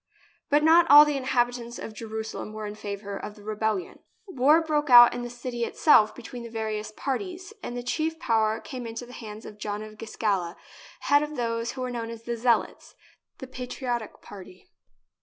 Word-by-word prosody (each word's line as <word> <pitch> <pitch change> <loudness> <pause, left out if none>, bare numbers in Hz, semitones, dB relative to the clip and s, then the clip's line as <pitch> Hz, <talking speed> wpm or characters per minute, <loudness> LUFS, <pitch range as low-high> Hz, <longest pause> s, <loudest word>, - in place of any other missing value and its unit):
But 295 +1 +3
not 330 +1 +6
all 295 +1 +10
the 295 -1 -1
inhabitants 245 -2 -1
of 220 - -7
Jerusalem 220 -1 -6
were 215 0 -6
in 205 - -5
favour 200 -1 -6
of 210 +1 -7
the 205 - -15
rebellion. 215 -3 -2 0.3
War 305 -4 +4
broke 300 -3 -1
out 240 -1 +9
in 245 - -4
the 240 - -5
city 240 0 -5
itself 215 -4 +4
between 245 0 -9
the 235 - -8
various 215 -1 -4
parties, 360 - -5
and 245 - -6
the 245 - -5
chief 315 +6 -2
power 220 -5 +1
came 250 -3 -7
into 230 +2 -6
the 245 - -13
hands 215 -2 -9
of 210 - -11
John 210 0 -4
of 215 0 -12
Giscala, 200 -6 -2 0.5
head 285 0 +4
of 300 0 -4
those 230 -1 -2
who 260 - -7
were 255 0 -3
known 230 -2 -4
as 230 -1 -9
the 235 0 -3
Zealots 235 0 0 0.2
— - - -52
the 265 - -8
patri 255 0 -7
otic 240 -3 -3
party. 185 -2 -13
235 Hz, 195 wpm, -26 LUFS, 215-260 Hz, 0.5 s, all